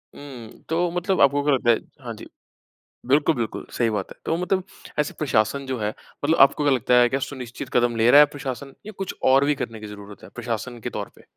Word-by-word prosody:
हुँ, 125 -6 -11
तो 170 +2 +1
मतलब 180 +2 0
आपको 140 +1 +4
क्या 145 -1 +3
लगता 120 -2 +1
है 115 - +2 0.3
हाँ - - -4
जी। - - -11 0.8
बिल्कुल, 145 +3 +3
बिल्कुल, 115 -3 -4
सही 115 -2 +2
बात 105 -3 -3
है। - - -10
तो 165 - 0
मतलब 185 +1 0 0.4
ऐसे 150 - 0
प्रशासन 135 -1 +1
जो 130 -3 -3
है 105 0 -1
मतलब 145 +8 -3
आपको 140 +2 +5
क्या 145 -2 +4
लगता 125 0 0
है 120 - +4
क्या 135 +2 -1
सुनिश्चित 130 -1 -6
कदम 120 -1 +2
ले 115 +1 +3
रहा 145 - +9
है 150 - +9
प्रशासन, 135 0 -6
या 215 - -7
कुछ 195 -1 -4
और 135 +2 +5
भी 145 0 +2
करने 115 -4 -5
की 105 - -8
ज़रूरत 100 0 -11
है - - -11
प्रशासन 120 +1 -4
के - - -4
तौर - - -5
पे? - - -19
135 Hz, 230 wpm, -23 LUFS, 115-145 Hz, 0.8 s, रहा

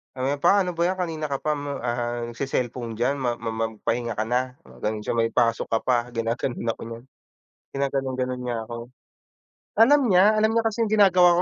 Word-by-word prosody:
sabi 130 - -4
niya, 145 0 -1
"Pa, 200 0 +5
ano 180 - -2
ba - - -1
yan 185 +1 -1
kanina 160 -3 -2
ka 140 - -1
pa 155 - +1
ma 145 -1 -4
ah, 120 0 -2
nagse-cellphone 120 -2 -3
diyan. 130 +4 +1
Ma 120 -2 0
ma 115 -1 -3 0.2
magpahinga 115 +2 -2
ka," 110 - 0
mga 125 +2 -3
ganon 105 0 -2
siya, - - -2
"May 115 0 +2
pasok 115 -2 +2
ka 115 - +3
pa," 125 -2 +3 0.2
ginaganon 115 +1 -2
ako - - -16
niyan. 115 +1 -8 0.7
Ginaganon-ganon 130 -2 -1
niya 120 -2 -2
ako. 120 -1 -6 1.0
Alam 285 +5 +7
niya 180 +1 +6
alam 220 +1 +3
niya 230 0 +2
kasi 225 +1 0
yung 215 - -2
ginagawa 185 -4 +6
130 Hz, 195 wpm, -24 LUFS, 120-160 Hz, 1.0 s, Alam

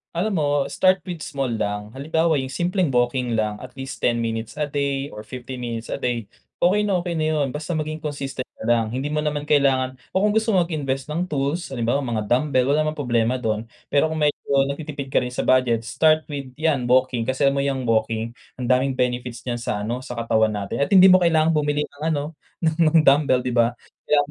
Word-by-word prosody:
Alam 185 0 0
mo, 145 - +1 0.2
start 185 -1 +3
with 175 -3 -6
small 135 -4 -3
lang, 105 -1 -3
halimbawa 160 +3 +1
yung 130 - -3
simpleng 180 +1 0
walking 125 -1 0
lang 105 -1 -1
at 130 +1 -11
least 135 0 -7
10 120 - +2
minutes 115 +1 -4
a 150 - -1
day 140 -1 -2
or 105 - -9
50 125 +3 -8
minutes 115 -1 -5
a - - -3
day, 120 -2 -1 0.4
okey 205 +4 +3
na 195 - +1
okey 175 - -3
na 155 -2 0
'yon, 145 -2 +1
basta 155 +3 -4
maging 155 0 -3
consistent 140 -4 -5
ka - - -10
lang. 115 0 +2
Hindi 130 +6 -3
mo 150 - 0
naman 150 -1 -1
kailangan 130 -3 +2 0.2
o 190 - +3
kung 210 - +3
gusto 220 0 +1
mo 180 - +4
mag-invest 140 -4 -3
ng 175 +4 -1
tools, 150 +2 -2
halimbawa 120 +3 +1
mga 120 -6 -2
dumbbell, 130 +3 +2
wala 150 - +3
namang 155 - -2
problema 120 -3 +1
do'n. 110 -3 -2 0.2
Pero 145 +2 +3
kung 160 - -4
medyo 145 -1 0 0.2
nagtitipid 140 -2 -6
ka - - +4
rin 125 - -3
sa - - -2
budget, 125 -3 +3
start 155 +6 +3
with 140 -2 -5
yan, 145 -5 0
walking. 125 -2 +2
Kasi 130 +2 0
alam 140 - +4
mo - - +2
yang 135 -2 -1
walking, 115 0 0 0.2
ang 125 -1 -4
daming 130 +1 +2
benefits 125 -1 -2
niyan 120 -1 -3
sa 105 -3 -3
ano, 120 +4 -2
sa 125 -1 -8
katawan 110 -2 +1
natin 100 +3 -4
at 140 - +2
hindi 190 -1 +7
mo 185 - +7
kailangan 165 -2 +3
bumili 150 -1 +1
ng 145 0 -12
ano, 145 - -1 0.4
ng 160 -1 +2 0.2
mga 160 - +8
dumbbell, 135 -3 +4
di 125 - -2
ba? 120 0 +2 0.3
Kailangan 145 -1 +4
135 Hz, 220 wpm, -23 LUFS, 120-155 Hz, 0.4 s, mga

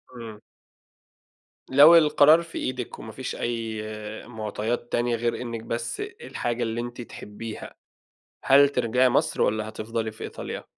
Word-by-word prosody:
إمم. 115 -3 -9 1.3
لو 145 +5 +8
القرار 155 0 +6
في 165 -1 -8
إيدِك، 125 -2 -4
وما 110 - -8
فيش 130 +3 -5
أي 115 -2 -3 0.5
مُعطيات 110 +1 -4
تانية 120 0 +1
غير 115 +1 -2
إنِّك 115 -2 -5
بس 115 0 -4
الحاجة 120 0 -4
اللي 115 0 -2
أنتِ 120 +1 -7
تحبيها، 110 -1 -9 0.7
هل 140 +1 +6
ترجعي 125 -1 +2
مصر 155 +5 +1
والّا 110 0 +1
هتفضلي 110 +1 -4
في 110 - -10
إيطاليا؟ - - -6
120 Hz, 135 wpm, -25 LUFS, 110-130 Hz, 1.3 s, لو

